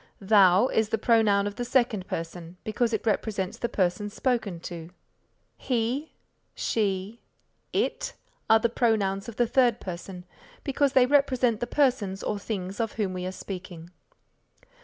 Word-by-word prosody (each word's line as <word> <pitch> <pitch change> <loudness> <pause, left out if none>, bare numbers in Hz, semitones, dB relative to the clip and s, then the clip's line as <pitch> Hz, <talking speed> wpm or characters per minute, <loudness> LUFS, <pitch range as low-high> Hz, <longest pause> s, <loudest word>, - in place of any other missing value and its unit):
Thou 195 +1 +5
is 220 -1 +1
the 225 - +1
pronoun 215 -3 +3
of 205 +1 -4
the 245 - -2
second 235 -6 +1
person 165 +1 -6
because 230 +2 0
it 220 - -2
represents 205 -3 -1
the 235 - -1
person 190 0 0
spoken 220 -6 -1
to. 170 -2 -7 0.7
He, 250 +5 -1 0.4
She, 205 0 -1 0.5
It - - -1 0.4
are 225 - +8
the 225 - +2
pronouns 215 -4 0
of 230 - -9
the 240 - +2
third 240 -1 +3
person 180 0 -7 0.4
because 280 -1 +1
they 255 -1 +6
represent 255 -4 +2
the 240 - -2
persons 235 -9 +1
or 210 - -2
things 195 -2 -5
of 225 -2 -1
whom 200 -4 -2
we 180 0 -4
are - - -3
speaking. 180 -3 -8
215 Hz, 150 wpm, -27 LUFS, 190-235 Hz, 0.7 s, are